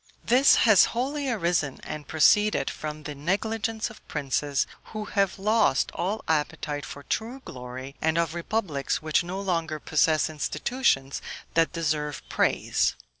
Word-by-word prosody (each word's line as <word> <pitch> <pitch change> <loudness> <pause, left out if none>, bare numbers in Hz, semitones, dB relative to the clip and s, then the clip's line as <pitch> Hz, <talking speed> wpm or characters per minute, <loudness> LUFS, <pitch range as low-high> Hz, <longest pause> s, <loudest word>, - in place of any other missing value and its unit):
This 255 +4 +6
has 215 -4 +7
wholly 280 +2 -1
arisen 170 - 0
and 150 -1 -6
proceeded 210 +7 +3
from 155 0 -6
the 150 0 -5
negligence 215 +9 -1
of 220 - -17
princes, 140 0 0 0.2
who 215 -1 -6
have 200 -2 0
lost 215 +3 +2
all 205 +5 -2
appetite 150 -1 -1
for 145 - -9
true 230 - -3
glory, 130 +1 -8
and 160 +1 +1
of 165 -1 +1
republics 170 -6 -2
which 155 +2 +2
no 180 +3 -4
longer 165 -5 -1
possess 155 +1 +2
institutions 155 - 0 0.3
that 165 0 +3
deserve 150 -3 -2
praise. - - +1
165 Hz, 135 wpm, -26 LUFS, 150-215 Hz, 0.3 s, has